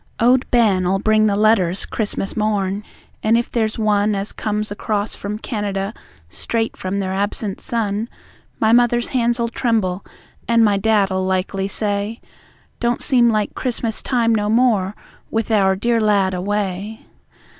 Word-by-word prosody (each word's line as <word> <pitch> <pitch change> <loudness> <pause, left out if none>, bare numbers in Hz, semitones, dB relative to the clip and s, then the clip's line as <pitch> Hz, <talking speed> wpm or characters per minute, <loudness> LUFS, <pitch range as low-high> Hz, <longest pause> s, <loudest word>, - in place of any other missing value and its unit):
Owd 250 +2 +3
Ben'll 195 -6 +3
bring 215 +2 +3
the 200 - +1
letters, 200 -4 +2
Christmas 205 -3 -3
morn, 205 -2 -1 0.4
and 225 +2 +3
if 235 - -2
there's 220 -2 0
one 210 -1 +2
As 195 +1 -3
comes 210 -1 -3
across 205 0 -2
from 205 +1 -5
Canada 205 -3 -3 0.3
straight 225 - -2
from 185 +1 -3
their 190 -1 -2
absent 200 +1 -2
son, 220 -1 -2 0.5
My 220 0 +3
Mother's 240 0 +3
hands'll 235 -2 +1
tremble, 215 -6 0 0.4
and 230 -1 +4
my 205 -1 +3
Dad'll 195 -2 +2
likely 190 +1 -1
say: 205 +2 -2 0.6
"Don't 240 0 0
seem 245 -4 +4
like 215 -2 0
Christmas 235 -3 -2
time 235 -3 +1
no 210 -1 0
more, 215 -4 +2 0.3
with 225 0 -2
our 195 -3 +3
dear 230 +3 +1
lad 200 -3 +2
away." 200 +2 -3
210 Hz, 145 wpm, -20 LUFS, 195-230 Hz, 0.6 s, and